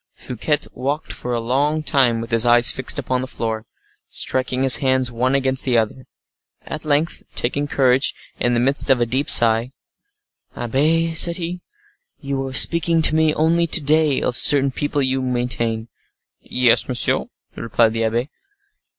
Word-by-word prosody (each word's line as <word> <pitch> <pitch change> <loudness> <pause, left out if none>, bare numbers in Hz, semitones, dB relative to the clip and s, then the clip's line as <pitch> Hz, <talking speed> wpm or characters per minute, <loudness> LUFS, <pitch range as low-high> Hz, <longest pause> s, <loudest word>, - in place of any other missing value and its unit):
Fouquet 135 +5 -2 0.2
walked 140 +4 -4
for 125 - -6
a 120 - -1
long 140 +6 -1
time, 125 -6 +1
with 115 - -9
his 115 0 +2
eyes 120 0 +4
fixed 130 - 0
upon 130 -1 -2
the 130 - -5
floor, 110 -3 -5 0.4
striking 130 0 -1
his 135 - +7
hands 130 -3 0
one 125 +3 -1
against 135 -1 0
the 125 -3 +1
other. 115 +3 -3 0.6
At 155 0 -7
length, 150 +2 -1
taking 140 +4 -1
courage, 130 -1 +1 0.2
in 120 0 0
the - - +1
midst 135 +4 0
of 130 -2 +3
a 120 - +1
deep 130 +5 -2
sigh: 115 +2 +4 0.8
"Abbe," 155 +7 0
said 170 +1 +3
he, 175 0 -6 0.6
"you 140 -2 -5
were 135 -1 -5
speaking 170 +1 +2
to 155 - +4
me 160 -1 +2
only 170 +2 +1
to 165 - +6
day 150 -1 +2
of 125 - -2
certain 140 -1 +4
people 145 +1 -2
you 130 0 -1
maintain." 120 -3 -3 0.5
"Yes, 125 -2 +1
monsieur," 125 -2 +1 0.3
replied 115 0 0
the 115 0 -2
abbe. 120 +5 -2
130 Hz, 165 wpm, -19 LUFS, 120-145 Hz, 0.8 s, his